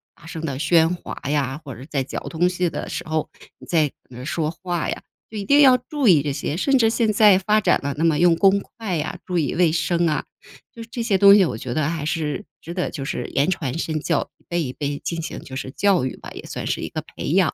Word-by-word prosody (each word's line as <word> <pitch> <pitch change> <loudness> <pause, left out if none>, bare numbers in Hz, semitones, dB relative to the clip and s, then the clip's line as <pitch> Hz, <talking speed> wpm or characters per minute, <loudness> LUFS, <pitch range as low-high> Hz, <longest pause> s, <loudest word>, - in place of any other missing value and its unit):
大 - - -19
声 165 -1 -6
的 140 -4 -3
喧 165 +2 +3
哗 155 - -7
呀， 145 -1 -1
或 135 -4 -8
者 120 - -10
在 140 -3 -1
嚼 130 - -5
东 175 +2 +1
西 180 -1 0
的 - - -5
时 - - -5
候 155 -1 -1 0.3
你 - - -14
在 155 -5 +2 0.2
你 125 - -13
在 125 - -7
说 155 +2 -1
话 175 +1 -3
呀， - - -4 0.3
就 220 - -7
一 205 - -3
定 285 +8 +5
要 260 -3 +7
注 265 +2 -2
意 165 -7 +6
这 145 - -1
些。 145 - -3
甚 275 +8 +3
至 225 -3 +4
现 225 -1 +1
在 210 -2 +6
发 210 +3 +2
展 - - +3
了， 140 0 -1
那 160 - -1
么 160 -3 +3
用 175 -1 +5
公 195 +3 +4
筷 200 -2 -5
呀、 150 - -3
注 180 -1 -2
意 155 - 0
卫 170 -2 +3
生 170 +1 +1
啊， 155 -2 0 0.5
就 230 - -10
是 225 - -15
这 235 - -3
些 210 -4 +2
东 200 +1 +8
西， 205 - +6
我 125 -9 -3
觉 120 +1 -5
得 155 +1 0
还 165 -3 -3
是 155 +4 -2 0.2
值 170 - -7
得 180 0 -1
就 140 - -6
是 135 - -3
言 140 +5 +1
传 145 -6 -2
身 160 -2 -2
教， - - -1
一 - - -31
辈 175 0 -1
一 130 - -4
辈 145 0 -3
进 170 -1 -4
行 - - -6
就 130 - -9
是 135 -1 -5
教 195 -3 +2
育 130 - -4
吧， - - -10
也 - - -9
算 - - -6
是 - - -1
一 - - -3
个 - - -4
培 - - -8
养。 - - +3
165 Hz, 290 characters per minute, -22 LUFS, 150-195 Hz, 0.5 s, 东